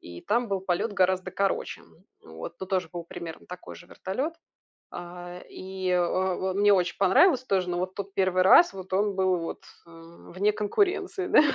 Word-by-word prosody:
и 85 0 -10
там 235 +3 0
был 195 -2 -2
полет 190 +4 -1
гораздо 185 -1 +1
короче, 195 0 -1
м, - - -21 0.3
вот. 80 - -9
Ну, 190 - -4
тоже 185 -3 -1
был 175 -1 -6
примерно 170 -1 -9
такой 180 0 -9
же 175 - -14
вертолет. 260 - -4 0.6
А 175 0 -8
и, 190 0 -6
э, 180 0 +3
в 185 +1 0
э, - - -3
мне 205 +1 +4
очень 180 -2 0
понравилось 255 - +4
тоже, 185 -6 0
но 175 - -1
вот 185 +1 -3
тут 200 -1 -6
1 185 -2 +2
раз, 265 - +7
вот 190 -1 -10
он 200 +1 +1
был, 185 -1 +2
вот, 165 - -6 0.2
э, - - -17 0.4
вне 205 +3 +2
конкуренции, 375 - 0
да. - - +7
190 Hz, 190 wpm, -27 LUFS, 180-200 Hz, 0.6 s, раз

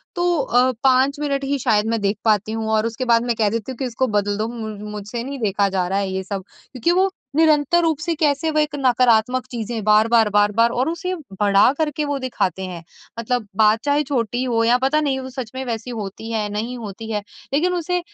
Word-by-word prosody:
तो 350 -1 +1
अ, 250 0 +3
5 265 +2 +3
मिनट 280 -2 -1
ही 280 +1 0
शायद 215 -4 +2
मैं 230 0 0
देख 200 +1 0
पाती 215 -1 +2
हूँ, 220 0 -3
और 220 0 +2
उसके 230 +3 -3
बाद 235 -1 +3
मैं 240 -1 0
कह 215 -2 +2
देती 230 +3 -3
हूँ 255 - -8
कि 265 - -2
इसको 255 +1 -1
बदल 205 -2 0
दो। 215 - -1
मु 230 -2 -6 0.2
मुझसे 210 +3 -5
नहीं 275 +2 -6
देखा 205 -2 +1
जा 185 -2 -1
रहा 195 +2 0
है 195 -1 -2
ये 190 0 -3
सब 195 0 -5 0.3
क्योंकि, 255 +5 0
वो 375 +2 +3 0.3
निरंतर 315 +1 +4
रूप 320 -3 +1
से 335 +2 -1
कैसे 300 0 +1
वो 305 - +1
एक 300 -1 0
नकारात्मक 250 -1 +3
चीज़ें 230 -2 -4
बार-बार, 215 +1 +4
बार-बार 210 +3 +3
और 255 +5 0
उसे 340 +2 -3 0.3
बड़ा 200 +2 +5
कर 315 -1 +1
के 300 +1 -2
वो 285 -1 -1
दिखाते 190 -8 -2
हैं। 175 -2 -7 0.4
मतलब, 235 -1 -2
बात 215 +1 +4
चाहे 290 +1 +2
छोटी 250 -3 -1
हो 230 -3 +1
या 235 +2 +4
पता 270 +4 +1
नहीं 275 -3 0
वो 260 0 -7
सच 255 -4 -6
में 260 - -3
वैसी 230 0 -4
होती 220 -1 -6
है 215 -2 -1
नहीं 230 +4 -3
होती 220 0 -7
है 210 -1 -1 0.3
लेकिन 350 +6 +2
उसे 360 +1 -1
235 Hz, 230 wpm, -21 LUFS, 215-275 Hz, 0.4 s, बड़ा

